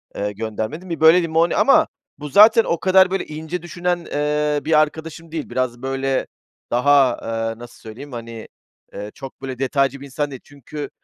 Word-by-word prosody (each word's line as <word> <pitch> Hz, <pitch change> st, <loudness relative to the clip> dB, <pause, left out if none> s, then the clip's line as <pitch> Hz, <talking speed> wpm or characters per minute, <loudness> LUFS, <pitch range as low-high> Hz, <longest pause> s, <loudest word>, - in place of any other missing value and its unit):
eee, 105 Hz, 0 st, -2 dB
göndermedim. 110 Hz, -, -5 dB
Bir 165 Hz, -, -4 dB
böyle 160 Hz, +3 st, +6 dB
limoni... 165 Hz, +1 st, +1 dB
Ama 315 Hz, +3 st, +5 dB, 0.3 s
bu 150 Hz, +1 st, -7 dB
zaten 220 Hz, +7 st, +7 dB
o 170 Hz, -, -1 dB
kadar 190 Hz, 0 st, +4 dB
böyle 195 Hz, -, -1 dB
ince 160 Hz, +3 st, -6 dB
düşünen, 175 Hz, +1 st, -2 dB
eee, 150 Hz, 0 st, -1 dB
bir 155 Hz, -1 st, +4 dB
arkadaşım 160 Hz, +2 st, -3 dB
değil. 160 Hz, -3 st, -5 dB
Biraz 125 Hz, -1 st, -2 dB
böyle 135 Hz, 0 st, -1 dB, 0.4 s
daha, 125 Hz, +4 st, +2 dB, 0.3 s
aaa, 115 Hz, 0 st, -3 dB
nasıl 120 Hz, 0 st, -12 dB
söyleyeyim, 125 Hz, +6 st, -10 dB
hani, 115 Hz, -2 st, -8 dB, 0.5 s
eee, 105 Hz, +1 st, -7 dB
çok 135 Hz, -1 st, -10 dB
böyle 130 Hz, -2 st, -6 dB
detaycı 135 Hz, 0 st, 0 dB
bir 140 Hz, -, -10 dB
insan 140 Hz, +1 st, -3 dB
değil. 130 Hz, -, -9 dB
Çünkü 145 Hz, +1 st, -8 dB
145 Hz, 175 wpm, -21 LUFS, 125-165 Hz, 0.5 s, zaten